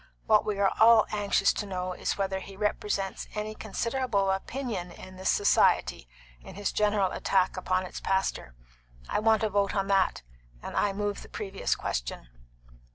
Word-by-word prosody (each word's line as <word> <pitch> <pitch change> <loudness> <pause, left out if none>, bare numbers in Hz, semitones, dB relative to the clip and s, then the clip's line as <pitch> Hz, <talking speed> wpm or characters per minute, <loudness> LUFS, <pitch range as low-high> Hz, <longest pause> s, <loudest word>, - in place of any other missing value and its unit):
What 215 -1 +4
we 210 -2 -1
are 200 -1 +2
all 225 0 +7
anxious 205 -1 +2
to 210 - -4
know 185 -1 -3
is - - -2
whether 195 -1 -1
he 195 0 -11
represents 205 -1 -2
any 210 0 -3
considerable 215 -2 -1
portion 235 -10 -4
of 185 0 -11
this 190 - 0
society 130 - +2 0.3
in - - -12
his 205 0 -2
general 205 -3 +1
attack 190 -1 +1
upon 185 0 -1
its - - -7
pastor. 190 - -1 0.5
I - - 0
want 220 0 +3
a 220 - +2
vote 200 +1 +1
on 195 -1 +1
that, 195 - +2 0.4
and - - -6
I 205 - +2
move 205 0 -3
the - - -13
previous 195 -1 -2
question." - - -4
200 Hz, 165 wpm, -28 LUFS, 190-210 Hz, 0.5 s, all